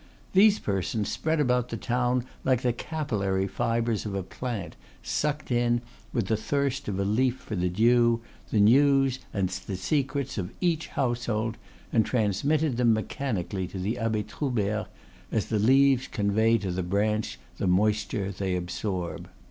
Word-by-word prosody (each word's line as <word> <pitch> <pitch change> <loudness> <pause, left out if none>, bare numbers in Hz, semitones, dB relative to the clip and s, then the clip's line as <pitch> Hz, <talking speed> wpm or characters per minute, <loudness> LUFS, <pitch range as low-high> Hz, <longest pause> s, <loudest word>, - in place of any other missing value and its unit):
These 205 +2 +6
persons, 100 - -1
spread 160 0 0
about 125 -3 +2
the 115 - -4
town 125 0 0 0.2
like 130 -2 +2
the 125 -2 +2
capillary 105 -10 -1
fibres 115 0 0
of 105 -2 -4
a 95 - -2
plant, 100 -4 -5 0.3
sucked 150 -2 -2
in, 120 0 +2 0.3
with 115 -5 0
the 110 - +1
thirst 140 +4 -1
of 100 -2 -2
a - - +2
leaf 125 +5 +2
for 110 - -6
the 90 -1 0
dew, 115 +4 +4 0.3
the 110 - +1
news 135 +4 +5
and 95 -2 0
the 95 +1 -5
secrets 135 +5 -1
of 90 -2 -3
each 165 -3 0
household, 120 -3 -1 0.3
and 115 - +5
transmitted 125 +7 +1
them 120 -2 +4
mechanically 105 - -2
to 95 - -8
the 100 +5 -2
Abbe 110 -2 0
Troubert, 110 -7 -2 0.4
as 110 - 0
the 110 - +1
leaves 130 +3 +4
convey 110 +2 +2
to 100 -4 -3
the 90 +1 -1
branch 105 - 0 0.2
the 95 - 0
moisture 100 +1 +1
they 95 -1 -2
absorb. 90 0 -3
115 Hz, 155 wpm, -27 LUFS, 100-130 Hz, 0.4 s, These